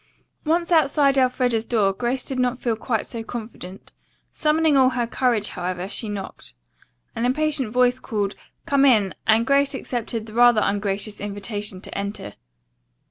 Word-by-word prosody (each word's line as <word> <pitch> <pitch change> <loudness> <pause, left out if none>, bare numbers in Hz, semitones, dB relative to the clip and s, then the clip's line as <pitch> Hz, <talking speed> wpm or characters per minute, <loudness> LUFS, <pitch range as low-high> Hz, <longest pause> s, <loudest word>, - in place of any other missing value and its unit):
Once 340 +3 0
outside 285 -3 +4
Elfreda's 250 -3 +1
door, 205 -5 +2
Grace 245 +5 -2
did 265 -2 -4
not 250 0 +1
feel 235 -2 -1
quite 225 0 -2
so 230 -1 -6
confident. 220 -5 -8 0.4
Summoning 310 -1 +2
all 260 -1 +5
her 245 -2 -1
courage, 235 -3 0
however, 180 +1 -4
she 210 +2 -3
knocked. 195 - -7 0.6
An 230 - -2
impatient 280 -1 +1
voice 250 +1 +2
called, 205 -5 -2 0.3
"Come 280 -1 +2
in," 215 -8 +4
and 225 +1 +4
Grace 280 0 +2
accepted 235 -4 -4
the 215 - -12
rather 240 -1 +5
ungracious 205 +1 -2
invitation 205 -1 -4
to - - -9
enter. 200 - -5
235 Hz, 150 wpm, -23 LUFS, 205-265 Hz, 0.6 s, all